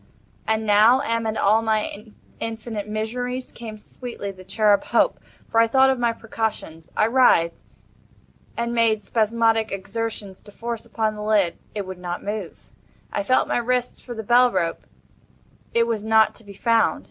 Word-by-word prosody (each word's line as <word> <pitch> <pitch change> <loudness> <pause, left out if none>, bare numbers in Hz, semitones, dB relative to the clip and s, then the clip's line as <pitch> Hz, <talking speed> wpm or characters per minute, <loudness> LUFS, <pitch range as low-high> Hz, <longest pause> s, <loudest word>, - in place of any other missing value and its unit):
And 220 0 0
now, 215 +5 +5
amid 230 -4 -1
all 215 +3 +4
my 215 -1 -1 0.3
infinite 220 -2 -5
miseries, 245 +4 -3
came 220 -2 -8
sweetly 215 -2 -7
the 185 -1 -13
cherub 205 +1 +2
Hope—for 225 - 0
I 230 - +5
thought 265 +3 +5
of 260 - -2
my 240 -1 +2
precautions. 220 -8 -5
I - - +4
writhed, 225 -9 +4 1.0
and 235 0 -1
made 225 -3 +2
spasmodic 225 +1 +1
exertions 200 0 -5
to 205 - -15
force 230 +1 -6
open 220 -1 -1
the 210 - -8
lid: 210 -5 +1 0.2
it 205 -2 -3
would 185 -1 -8
not 175 -1 -5
move. 205 -3 -6 0.4
I - - 0
felt 255 +6 +2
my - - 0
wrists 245 +1 -1
for 240 - -8
the 220 - -5
bell 245 +3 +5
rope: 170 -4 -2 0.8
it 230 0 +3
was 225 -3 -2
not 220 0 +4
to 230 - -14
be 200 -1 -12
found. 230 +2 +2
220 Hz, 160 wpm, -23 LUFS, 205-235 Hz, 1.0 s, now